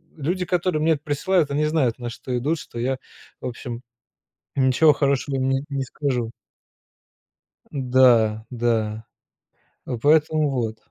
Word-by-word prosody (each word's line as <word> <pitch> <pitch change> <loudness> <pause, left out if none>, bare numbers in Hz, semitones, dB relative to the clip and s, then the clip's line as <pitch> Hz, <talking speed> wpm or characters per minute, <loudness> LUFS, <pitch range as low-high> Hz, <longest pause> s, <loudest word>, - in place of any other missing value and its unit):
Люди 175 +5 -2
которые 175 -2 0
мне 160 -1 +4
присылают 150 +2 0
они 150 +2 +1
знают 150 -7 +1
на 120 -1 -5
что 125 +1 -4
идут, 150 +6 -1
что - - -10
я 130 +2 -1 0.4
в - - -3
общем 120 -1 -6 0.7
ничего 135 +3 +5
хорошего 140 -1 0
им 130 0 0
не 135 +1 0
не 140 -1 -2
скажу. 125 -4 -2 1.4
Да, 125 -5 +3
да. 115 -3 -1 0.8
Ну 120 - -3
поэтому 155 +1 +3
вот. 115 -4 -2
135 Hz, 130 wpm, -23 LUFS, 120-150 Hz, 1.4 s, ничего